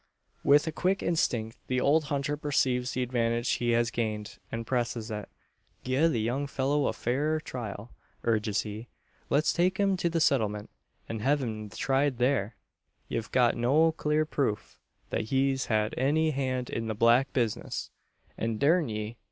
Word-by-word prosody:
With 145 +1 +5
a 160 - -2
quick 185 +5 0
instinct 115 -9 0
the 130 0 +1
old 150 +4 +3
hunter 145 0 -1
perceives 130 -4 0
the 130 - 0
advantage 120 -1 0
he 120 - 0
has 120 0 +2
gained, 110 -3 -3
and 115 0 -4
presses 120 -2 -2
it. 105 -2 -5 0.5
"Gie 130 +6 +2
the 130 -8 0
young 125 +6 -1
fellur 140 +1 +1
a - - -2
fair 150 +6 0
trial," 115 -5 -6 0.3
urges 105 -2 +1
he. 110 +2 -7 0.4
"Let's 150 +2 +2
take 185 +2 +2
him 195 -1 +3
to 175 - 0
the 165 0 0
settlement, 105 -9 +1 0.4
an 115 - -4
hev' 140 +5 +1
him 110 -3 -4
tried 135 +3 0
thur. 120 -4 +1 0.5
Ye've 115 -1 -3
got 125 -2 +3
no 145 +8 +3
clur 155 -1 0
proof, 135 -8 -2 0.3
that - - -1
he's 135 +2 +1
had 110 -1 +1
any 155 +4 +2
hand 130 -3 -2
in 115 0 -3
the 110 - -2
black 120 +5 +4
bizness; 115 -5 -2 0.5
and 115 -1 -1
durn 160 +2 +3
me! 110 +1 -4
125 Hz, 165 wpm, -29 LUFS, 115-145 Hz, 0.5 s, With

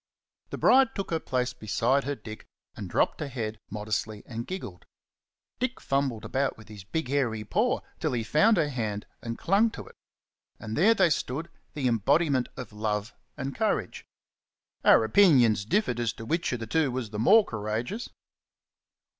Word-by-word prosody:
The - - -5
bride 265 -2 +4
took 195 -3 -4
her 165 - +1
place 125 -3 -1
beside 120 +6 0
her 145 +1 -2
Dick, 110 -4 -10 0.3
and - - -7
dropped - - +1
her 150 - -3
head 110 -5 -4
modestly 105 0 -3
and 115 0 -6
giggled. 100 - -7 0.7
Dick 255 0 -2
fumbled 135 -5 -1
about 135 0 -1
with 110 -1 -15
his 105 -3 -10
big 160 +9 -3
hairy 120 -6 0
paw 215 - +1 0.2
till 155 -5 -1
he 115 -2 -1
found 205 - +4
her 155 -3 +2
hand 110 -6 -3 0.2
and 115 0 -5
clung 200 +5 +3
to - - -9
it. - - -16 0.6
And 110 +1 -5
there 215 +8 +5
they 185 -5 +4
stood, 155 +4 -2 0.2
the 140 -4 0
embodiment 130 - +2
of 125 -5 -7
love 105 0 -2 0.2
and 135 +1 -4
courage. 210 - -1 0.8
Our - - +6
opinions 120 - +5
differed 125 - 0
as 115 -2 0
to 110 - -9
which 165 +7 -1
of 120 -2 -3
the - - -3
two 150 +5 +1
was 125 -4 -4
the 105 - -4
more 210 - +6
courageous. 110 - -4
125 Hz, 170 wpm, -27 LUFS, 110-160 Hz, 0.8 s, Our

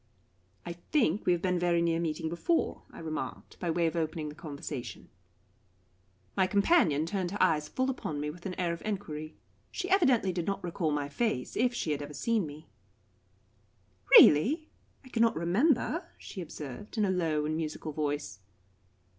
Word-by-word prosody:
"I 170 - -4 0.2
think 220 - +2
we - - +6
have 175 -1 0
been 180 -1 +1
very 175 -1 +2
near 165 -1 +1
meeting 160 -1 -2
before," 170 - 0
I - - -13
remarked, 160 -1 -6
by 175 - -2
way 170 +1 +1
of 165 - 0
opening 160 -2 -2
the - - -8
conversation. 145 -4 -7 1.3
My 190 - +3
companion 200 - +3
turned 185 0 -2
her 200 - -4
eyes 150 -2 +3
full 260 +10 -1
upon 160 - -3
me 150 +1 -2
with 175 +4 -8
an 185 - -5
air 175 -2 +1
of 170 - -7
enquiry. 160 -7 -4 0.3
She 370 -1 -4
evidently 265 - +4
did 175 -1 -3
not 200 - -2
recall 170 -2 -1
my 145 -1 -1
face, 145 - -2
if 245 +1 +2
she 165 - -1
had 145 -1 -1
ever 145 0 -7
seen 220 +2 0
me. 150 +2 -11 1.5
"Really 305 - +6 0.4
I - - -13
cannot 230 -2 +2
remember," 245 - +1
she 190 - -8
observed, 155 - -8
in 210 - +3
a 190 - +1
low 160 -5 0
and 155 +1 -1
musical 155 0 -4
voice. 145 -7 -3
170 Hz, 170 wpm, -30 LUFS, 155-205 Hz, 1.5 s, we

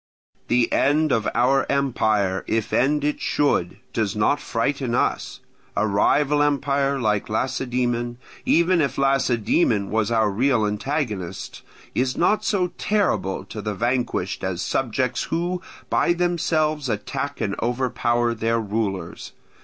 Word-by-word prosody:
The 120 -1 +2
end 150 +2 +3
of 110 -3 +1
our 135 +3 +3
empire, 110 -8 +1
if 110 -2 -1
end 145 +3 +2
it 150 0 -1
should, 95 -11 +1 0.2
does 110 -3 -1
not 105 +7 +2
frighten 125 +1 -1
us: - - -1 0.4
a - - +3
rival 145 +8 +2
empire 140 -1 +1
like 105 -4 0
Lacedaemon, 120 0 -1 0.3
even 170 +1 +3
if 140 - -1
Lacedaemon 125 - +2
was 110 -1 +1
our 110 -3 +2
real 120 +1 +2
antagonist, 105 - -3 0.3
is 130 +1 0
not 210 +5 +2
so 185 -5 0
terrible 105 - 0
to 105 +1 -7
the 105 0 -3
vanquished 120 -5 -1
as 95 -1 -2
subjects 125 0 -1
who 175 +2 -2 0.3
by 175 - +3
themselves 160 -5 0
attack 135 +7 -3
and 100 -2 -1
overpower 120 -1 0
their 115 +1 0
rulers. 100 -5 -3
125 Hz, 130 wpm, -23 LUFS, 110-145 Hz, 0.4 s, end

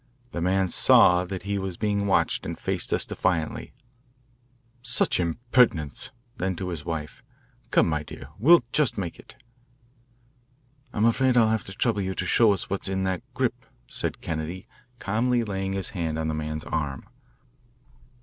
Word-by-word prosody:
The 85 - -4
man 95 +2 +2
saw 90 +1 +5
that 90 -1 -6
he 100 0 -2
was 95 -2 -4
being 100 -1 0
watched 95 - +2
and - - -5
faced - - -3
us - - +2
defiantly, 85 -4 -2 1.1
"Such 125 -4 +3
impertinence!" 85 - +1 0.3
Then 95 0 -1
to 90 +2 -4
his 80 -4 -5
wife, 75 -2 -5 0.5
"Come, - - +4
my 75 -2 0
dear, 70 -3 -10
we'll 155 - +6
just 150 -4 +1
make 90 -4 -4
it." - - -15 1.6
"I'm 105 - +1
afraid 125 +2 +3
I'll 115 -2 +5
have 110 -1 -1
to 95 - -8
trouble 105 0 0
you 95 0 -3
to 90 - -2
show 110 +3 +4
us 100 - -1
what's 100 0 -3
in 95 0 -1
that 95 -2 -1
grip," - - -1 0.2
said - - -3
Kennedy, 80 +3 -4 0.3
calmly 120 +3 0
laying 95 -2 -3
his 95 -2 -1
hand 80 -5 -3
on 80 0 -1
the - - -1
man's 75 0 -4
arm. 70 -4 -3
95 Hz, 160 wpm, -26 LUFS, 80-105 Hz, 1.6 s, we'll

